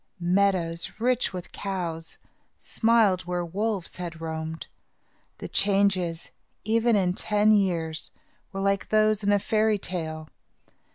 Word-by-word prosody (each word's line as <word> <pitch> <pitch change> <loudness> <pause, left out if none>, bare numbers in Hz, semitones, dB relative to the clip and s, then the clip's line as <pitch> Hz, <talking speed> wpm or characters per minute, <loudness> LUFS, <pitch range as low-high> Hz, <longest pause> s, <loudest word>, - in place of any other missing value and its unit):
Meadows, 175 -2 +1
rich 250 +1 +1
with 180 -2 -7
cows, 170 -5 -4 0.4
smiled 220 -6 +2
where 175 0 -2
wolves 200 +1 -3
had 170 -2 -6
roamed. 160 0 -5 0.7
The - - -6
changes, 195 -4 +1 0.3
even 230 +2 +2
in 185 -3 +2
ten 210 +2 +2
years, 170 -6 +1 0.4
were 195 -1 -4
like 200 0 0
those 215 -1 +3
in 205 0 +1
a 205 - +5
fairy 215 +1 +1
tale. 160 -5 -5
190 Hz, 120 wpm, -26 LUFS, 170-210 Hz, 0.7 s, a